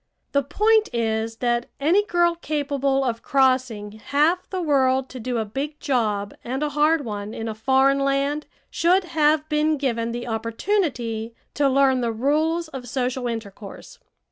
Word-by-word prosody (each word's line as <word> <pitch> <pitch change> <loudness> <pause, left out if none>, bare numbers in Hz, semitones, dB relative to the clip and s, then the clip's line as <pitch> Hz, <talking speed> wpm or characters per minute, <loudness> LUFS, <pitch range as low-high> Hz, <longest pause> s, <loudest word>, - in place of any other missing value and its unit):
The 280 - +3
point 430 - +2
is 225 -1 -1
that 240 0 +1
any 340 +9 +3
girl 345 -3 +2
capable 280 -4 -1
of 235 -3 -2
crossing 255 -6 +1
half 310 +6 +1
the 375 - -3
world 265 -5 +2
to 255 - -8
do 245 +1 -2
a 220 - -1
big 280 +8 -5
job 215 -8 -1
and 265 +4 -3
a 300 - 0
hard 300 +1 +2
one 210 -1 -5
in 225 - -4
a 220 - -3
foreign 265 +5 +3
land 275 +2 0 0.2
should 365 +3 +3
have 310 -2 +2
been 305 0 +1
given 235 -4 -1
the 240 +1 -5
opportunity 230 - -2 0.2
to 285 -1 +2
learn 265 -1 +3
the 235 -1 0
rules 310 +8 0
of 255 -5 -8
social 250 0 -2
intercourse. 215 -3 -8
270 Hz, 160 wpm, -23 LUFS, 230-300 Hz, 0.2 s, The